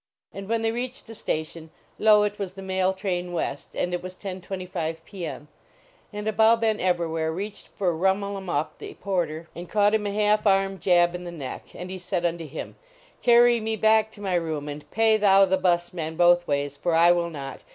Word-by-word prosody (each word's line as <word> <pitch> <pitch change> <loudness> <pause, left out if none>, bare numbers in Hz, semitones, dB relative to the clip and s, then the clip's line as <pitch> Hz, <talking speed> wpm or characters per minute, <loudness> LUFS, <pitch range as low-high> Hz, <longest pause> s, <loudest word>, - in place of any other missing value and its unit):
And 195 +1 -8
when 230 0 0
they 225 - +2
reached 245 +2 -5
the 225 - -10
station, 160 -4 -4 0.3
lo, 210 -1 +6
it 210 0 -2
was 190 -2 -4
the 195 0 -9
mail 190 0 +1
train 180 -2 -3
west, 145 -4 -4
and 180 - -1
it 175 - -1
was 185 0 -8
10: 185 -1 -6
25 180 -4 -4
i>. - - -9
M. 150 -2 -6 0.6
And 210 0 -5
Abou 220 +1 +4
Ben 220 -2 +1
Evrawhair 165 -3 0
reached 200 +5 -6
for 180 -3 -1
Rhumul 195 +4 0
em 190 -1 -7
Uhp 155 -3 0
the - - -8
Porter 170 -4 -2
and 175 0 -8
caught 205 0 +3
him 210 -1 +1
a - - -2
half 210 +1 +2
arm 195 -1 +2
jab 175 -1 +3
in 180 0 -6
the 175 - -6
neck, 145 -6 -7
and 180 +1 -7
he 190 - -5
said 180 -1 -2
unto 170 -1 -2
him: 155 +2 -7 0.4
Carry 240 0 +5
me 220 0 -2
back 220 +1 +3
to 205 - -13
my 195 -2 -2
room 160 -4 -1
and 150 0 -8
pay 220 +2 +3
thou 195 -2 +6
the 190 0 +2
bus 175 -2 +1
man 160 -2 -4
both 175 +1 +4
ways, 145 -1 -1
for 170 +3 0
I 170 +1 +6
will 175 -1 +1
not. 140 -4 -8
185 Hz, 215 wpm, -25 LUFS, 170-205 Hz, 0.6 s, lo